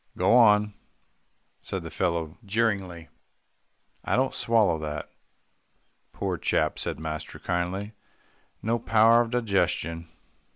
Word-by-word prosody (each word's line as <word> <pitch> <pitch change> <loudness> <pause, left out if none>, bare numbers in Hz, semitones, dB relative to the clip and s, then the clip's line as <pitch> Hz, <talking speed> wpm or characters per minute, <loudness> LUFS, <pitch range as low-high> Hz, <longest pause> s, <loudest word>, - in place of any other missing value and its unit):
"Go 95 +6 +4
on," 105 -3 +5 0.9
said 95 -3 -5
the 80 - -8
fellow 85 -3 -2
jeeringly, 100 -6 -1 0.9
"I - - 0
don't 130 +1 +1
swallow 110 -8 +2
that." 75 -1 -5 1.0
"Poor - - -3
chap," - - 0
said - - -3
master 80 -1 -6
kindly, 95 +4 -3 0.7
"no 115 +2 0
power 115 +1 +5
of 120 - -2
digestion. 90 -8 -1
95 Hz, 110 wpm, -26 LUFS, 85-115 Hz, 1.0 s, on